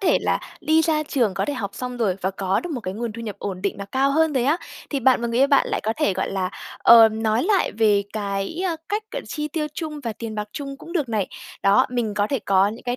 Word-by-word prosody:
thể 390 - +3
là - - +1 0.2
đi 320 +1 +3
ra 310 -1 +1
trường, 245 -9 0
có - - 0
thể 290 - -2
học 200 -7 -4
xong 250 -1 -5
rồi 210 -6 0
và 190 +1 0
có 195 0 -1
được 355 - -6
một 250 - -3
cái 185 -2 -5
nguồn 230 +1 -3
thu 230 +1 -7
nhập 210 -3 -5
ổn 185 -2 -5
định 200 - -1
và 200 - -5
cao 265 +7 +1
hơn 320 +2 +2
rồi 255 -3 +1
á, 290 +5 +3 0.3
thì 280 - -1
bạn 260 0 +4
và - - 0
người 235 +1 -1
yêu 275 - +6
bạn 280 -1 +4
lại - - -1
có 220 - +1
thể, 200 - +2
gọi 190 +1 -2
là, 185 -1 -1 0.3
ờ, 230 -1 +8
nói 220 +1 0
lại 405 -4 +2
về 210 -2 +3
cái, 200 - -3
ơ, 340 -3 -1
cách, 420 +1 -1
gọi - - -3
là, - - -17
chi 300 -1 -3
tiêu 305 0 -2
chung 305 -2 -5
và 230 - -2
tiền 220 0 -6
bạc 210 0 -4
chung 275 -3 -6
cũng 335 - -11
được 305 -8 0
này. 215 -4 -1 0.3
Đó, 200 +1 +5
mình 235 -4 -1
có 205 0 +1
thể 275 - +1
có 195 -2 +3
những 225 - -8
cái 245 0 -1
235 Hz, 285 wpm, -23 LUFS, 205-290 Hz, 0.3 s, ờ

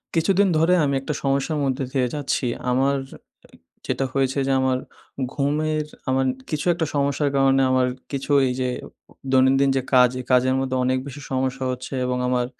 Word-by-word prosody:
কিছুদিন 195 +4 +3
ধরে 165 +3 +3
আমি 140 -1 +1
একটা 150 - -3
সমস্যার 140 +3 0
মধ্যে 135 0 -1
দিয়ে 130 -2 +1
যাচ্ছি। 145 -2 -1 0.2
আমার 135 +3 +2 0.6
এ - - -15 0.3
যেটা 135 - 0
হয়েছে 135 0 0
যে - - +1
আমার 130 -1 +1 0.6
ঘুমের 150 +2 0 0.2
আমার 130 0 +2 0.2
কিছু 150 -1 -2
একটা 165 -1 -1
সমস্যার 140 +1 +1
কারণে 135 0 +4
আমার 130 -1 +3 0.2
কিছু 135 0 -4
ঐযে 130 -1 0 0.6
দৈনন্দিন 135 +1 +4
যে - - +1
কাজ, 125 -1 +7
এই 125 - -7
কাজের 130 +1 +4
মধ্যে 130 -1 -2
অনেক 130 +1 +1
বেশি 140 +1 -8
সমস্যা 130 0 -1
হচ্ছে 125 +2 -6
এবং 125 0 -1
আমার 125 -1 +1
135 Hz, 165 wpm, -23 LUFS, 130-140 Hz, 0.6 s, কাজ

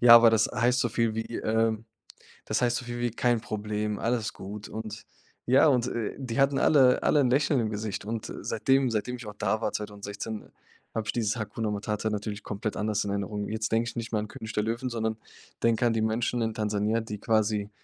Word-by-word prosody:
ja, 120 -1 +10
aber 115 -1 +9
das 110 -1 +4
heißt 120 +1 +2
so 120 - +2
viel 115 0 0
wie, 115 +1 -3
ähm 110 0 +1 0.6
das - - 0
heißt 120 -1 +2
so 125 - -6
viel 120 0 -5
wie: 120 -1 0
„Kein 120 +1 +2
Problem, 105 -1 -3
alles 115 -2 0
gut,“ 105 +2 -8
und 110 -1 -7 0.4
ja, 130 +6 +6
und, 125 -4 +3
äh, 115 -4 -3
die 125 -3 -3
hatten 135 0 +4
alle 130 -4 +5
alle 150 - +4
'n 130 -3 +3
Lächeln 140 +1 +3
im 110 -2 0
Gesicht 105 -1 -4
und, 110 0 -4
äh, - - -5
seitdem 135 -1 +2
seitdem 115 +2 -1
ich 120 -3 -9
auch 105 - -7
da 110 - 0
war, - - 0
2016, 105 +1 -5 0.5
habe 110 -1 -2
ich - - +1
dieses 115 -2 0
Hakuna 110 0 -3
Matata 105 +1 -2
natürlich 105 0 -4
komplett 105 +1 -3
anders 105 0 0
in 100 - -3
Erinnerung. 100 +1 -2
Jetzt 110 0 -2
denke 115 +1 +2
ich - - -10
nicht 115 -1 -4
mehr 110 - +1
an 105 - -3
König 110 +1 -8
der 105 - +1
Löwen, 115 +4 -2
sondern 110 -2 -2 0.5
denke 115 +1 +3
an 115 - +2
die 110 - 0
Menschen 115 +2 0
in 110 0 -1
Tansania, 105 +1 0
die 105 -2 -6
quasi, 105 -1 +1
110 Hz, 220 wpm, -28 LUFS, 105-120 Hz, 0.6 s, ja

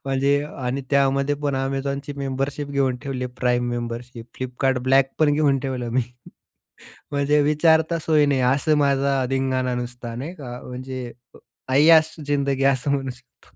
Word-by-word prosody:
म्हणजे 135 +1 +2 0.2
आणि 130 +1 -3
त्यामध्ये 140 0 +2
पण 140 -1 0
Amazonची 140 +1 -3
मेंबरशिप 140 +1 -3
घेऊन 135 -3 +1
ठेवली 130 -2 -3
प्राईम 125 -1 +1
मेंबरशिप. 120 0 -5
फ्लिपकार्ट 130 +1 -1
ब्लॅक 135 0 +4
पण 150 -2 +4
घेऊन 145 -2 +2
ठेवलं 130 -3 -3
मी. 125 +2 +1 1.1
म्हणजे 145 +1 +2
विचारता 160 +2 +3
सोय 155 -2 +4
नाही 140 -2 +1
असं 150 +2 +1
माझा 140 -2 +2
धिंगाना 130 -1 0
नुसता 120 -1 -6
नाही 140 +8 -5
का? 125 -6 -8
म्हणजे 130 0 -6 0.3
अ, - - -13 0.4
ऐयाश 160 +2 +5
जिंदगी 140 -1 0
असं 130 +2 -2
म्हणू 135 -2 -1
शकतो. 125 0 -15
135 Hz, 145 wpm, -23 LUFS, 125-145 Hz, 1.1 s, ऐयाश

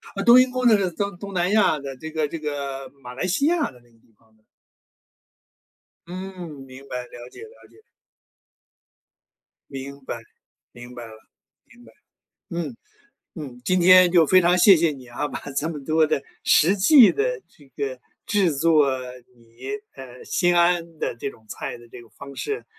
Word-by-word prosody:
啊， 200 - -3
冬 240 +4 +8
阴 255 0 +3
功 255 0 +1
那 225 - +6
是 200 - 0
呃， 185 - -1
东 200 +1 -4
东 200 +1 -8
南 180 0 0
亚 205 -8 +3
的 140 -1 -7
这 160 +4 -8
个 155 -1 -1
这 165 - -6
个 140 -3 -5
马 125 -1 -9
来 130 - -3
西 190 +10 0
亚 335 - 0
的 125 - -18
那 120 0 -26
个 115 - -27
地 115 - -31
方 110 -1 -31
的。 110 - -36 1.6
嗯， 185 -1 -8 0.2
明 130 +1 -13
白， 125 0 -4
了 120 0 -12
解 - - -12
了 450 +2 -18
解。 440 - -22 1.9
明 140 +1 -8
白， - - -5 0.5
明 120 +1 -12
白 120 -1 -9
了， 110 - -12 0.5
明 240 +1 -20
白。 - - -17 0.6
嗯， 165 -8 -4 0.6
嗯， 135 -7 -9
今 185 0 +1
天 185 0 +7
就 170 -3 +4
非 185 +4 +5
常 175 0 +3
谢 195 +1 +7
谢 165 -1 +1
你 130 -3 -12
啊， 120 +5 -4
把 - - -6 0.2
这 155 - 0
么 150 -4 -6
多 155 +2 +2
的 140 - -1 0.2
实 180 +6 +4
际 235 +5 +7
的 475 +2 -1
这 145 -2 -22
个 130 -2 -4 0.3
制 195 -7 +1
作， 155 0 +3 0.5
你， 115 +2 -15 0.3
呃， 130 -2 -12
心 175 -1 +1
安 170 -1 +1
的 - - -3
这 135 - -5
种 110 -3 -20
菜 125 +3 -6
的 120 0 -17
这 120 - -12
个 115 - -18
方 140 +5 -12
式， 430 +2 -4
160 Hz, 200 characters per minute, -23 LUFS, 130-185 Hz, 1.9 s, 冬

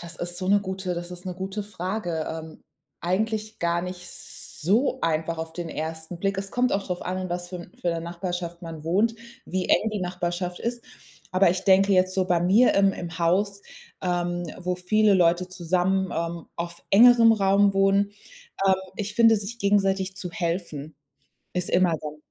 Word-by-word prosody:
das 170 -1 -9
ist 175 +1 -5
so 185 - -3
'ne 200 +1 +5
gute 190 -2 -3
das 175 +1 -6
ist 180 +1 -10
'ne 180 - -4
gute 190 +3 -4
Frage. 180 -4 -3
Ähm, 160 0 -8 0.4
eigentlich 215 +4 -1
gar 170 0 0
nicht 180 0 -7
so 230 - -2
einfach 165 0 0
auf 160 0 -5
den 170 0 -5
ersten 160 +2 -5
Blick. 195 0 0
Es 195 0 -4
kommt 250 0 +1
auch 195 0 0
drauf 180 -2 -3
an, 185 +1 -2
in 185 0 -4
was 175 0 -4
für 180 - -6
'n 175 0 -11
für 175 - -1
'ner 165 0 -2
Nachbarschaft 175 0 -5
man 165 -2 -8
wohnt, 205 +8 +2 0.3
wie 185 0 -2
eng 220 - +3
die 210 - -2
Nachbarschaft 180 0 -3
ist. 240 0 -3 0.5
Aber 185 -1 +5
ich 185 +2 -3
denke 195 +1 +5
jetzt 185 0 +3
so 185 -1 +1
bei 175 -2 +2
mir 200 +8 +5
im 195 -1 +4
im 170 -2 -7
Haus, 195 +4 +1 0.4
ähm, 175 -1 -1
wo 180 0 -2
viele 210 +3 +3
Leute 175 0 +3
zusammen, 185 +1 0
ähm, 170 0 -3
auf 170 0 -6
engerem 230 +2 +7
Raum 200 -1 +3
wohnen, 195 +1 +3 0.5
ähm, 190 - +6 0.2
ich 210 0 -4
finde, 225 0 +6
sich 210 +3 -5
gegenseitig 195 -2 +1
zu 180 -1 -5
helfen 165 -4 -3 0.6
ist 180 -1 -1
immer 180 -1 +3
dann 150 -1 -6
185 Hz, 185 wpm, -25 LUFS, 175-195 Hz, 0.6 s, engerem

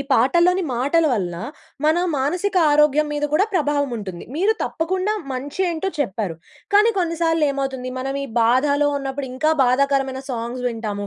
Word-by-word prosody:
పాటలని 345 +9 +3
మాటల 285 +7 +2
వల్ల 180 -6 -1 0.5
మన 315 +2 +4 0.2
మానసిక 355 +9 -1 0.2
ఆరోగ్యం 300 0 +4
మీద 295 0 -1
కూడా 365 +7 +4
ప్రభావం 290 -4 +1
ఉంటుంది. 190 -5 -7
మీరు 395 +6 +3
తప్పకుండా 370 +5 -1 0.2
మంచి 280 +7 -5
ఏంటో 340 +3 -2
చెప్పారు. 200 - -2 0.4
కానీ 420 +3 +5
కొన్నిసార్లు 330 -2 +1
ఏమవుతుంది 270 -2 -3
మనం 270 +1 -3
ఈ - - -6
బాధలో 285 +5 +3
ఉన్నప్పుడు 275 0 -4
ఇంకా 310 +5 +1
బాధాకరమైన 270 +1 +1
సాంగ్స్ 240 +1 -4
వింటాము. 210 -3 -4
280 Hz, 140 wpm, -21 LUFS, 255-325 Hz, 0.5 s, కానీ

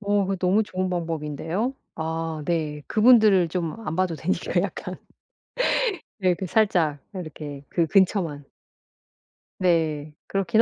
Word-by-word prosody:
어 205 0 +2
그거 195 - -1
너무 190 +4 +3
좋은 185 -2 -2
방법인데요. 165 - -2 0.2
아 160 -1 -3
네. 155 -3 -1
그분들을 215 -6 +6
좀 165 -2 -2
안 155 - -2
봐도 185 -3 +1
되니까 190 - 0
약간 - - -4 1.2
이렇게 185 0 +1
살짝 175 -7 +2
이렇게 150 -6 -7
그 170 -2 +1
근처만. 180 -7 +2 1.1
네. 160 -4 +1
그렇긴 205 +3 +2
175 Hz, 245 characters per minute, -25 LUFS, 160-195 Hz, 1.2 s, 그분들을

